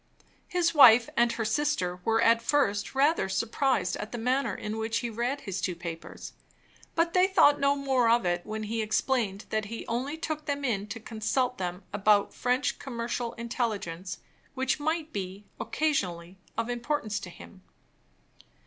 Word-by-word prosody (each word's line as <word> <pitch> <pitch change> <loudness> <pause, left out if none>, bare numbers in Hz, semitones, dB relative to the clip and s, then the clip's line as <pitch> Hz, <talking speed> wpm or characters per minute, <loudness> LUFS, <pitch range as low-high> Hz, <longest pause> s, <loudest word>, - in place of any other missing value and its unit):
His 355 -2 +1
wife 245 -6 +8
and 235 0 +3
her 230 -1 -2
sister 215 -8 0
were 225 +2 +2
at 230 0 +5
first 235 -4 +1
rather 285 - +3
surprised 230 -1 0
at 210 - -6
the 240 - -4
manner 250 -1 0
in 215 +1 -4
which 225 +1 -1
he 235 0 -3
read 245 +6 -2
his 195 -2 -4
two 180 - -1
papers; 170 -1 -8 0.6
but 335 0 +2
they 370 0 +5
thought 295 -7 +5
no 280 0 +3
more 265 -4 +2
of 235 -3 +3
it 175 0 0
when 215 0 -5
he 225 +1 -2
explained 220 -2 0
that 215 -1 0
he 230 +2 -6
only 260 +7 -2
took 310 -1 -4
them 285 -1 -1
in 210 -5 -1
to 230 - -6
consult 235 +3 -1
them 180 +1 -4
about 205 0 +3
French 250 +2 0
commercial 235 -2 -3
intelligence, 215 -6 -3 0.4
which 265 +1 0
might 315 +1 -2
be, 195 +1 -5
occasionally, 185 - -2 0.2
of 230 0 0
importance 240 -3 -2
to 185 - -8
him. 185 +2 -13
230 Hz, 165 wpm, -28 LUFS, 205-270 Hz, 0.6 s, wife